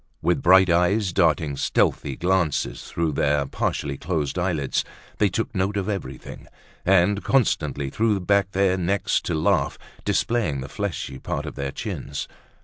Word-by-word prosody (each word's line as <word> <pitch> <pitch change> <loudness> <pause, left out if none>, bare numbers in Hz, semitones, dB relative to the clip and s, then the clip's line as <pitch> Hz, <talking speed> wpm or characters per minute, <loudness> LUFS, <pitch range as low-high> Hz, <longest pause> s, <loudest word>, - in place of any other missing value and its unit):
With - - +2
bright 95 0 +6
eyes 90 +3 +2
darting 80 -5 +2
stealthy 70 0 0
glances 90 -3 0
through 85 -2 -1
their 70 0 +1
partially 70 0 -2
closed 80 -2 -2
eyelids, 85 -7 0 0.4
they 105 - +4
took 115 +5 -2
note 100 +1 0
of 100 - -2
everything, 70 -11 -6 0.4
and 95 +2 +3
constantly 75 - +1
threw 110 +1 +1
back 100 +1 +2
their 95 -1 +2
necks 95 +2 0
to 85 - -2
laugh, 80 - +1 0.3
displaying 85 - 0
the 65 - -7
fleshy 90 -9 -4
part - - -3
of - - -6
their 70 -1 -4
chins. 70 +1 -5
90 Hz, 145 wpm, -24 LUFS, 75-100 Hz, 0.4 s, bright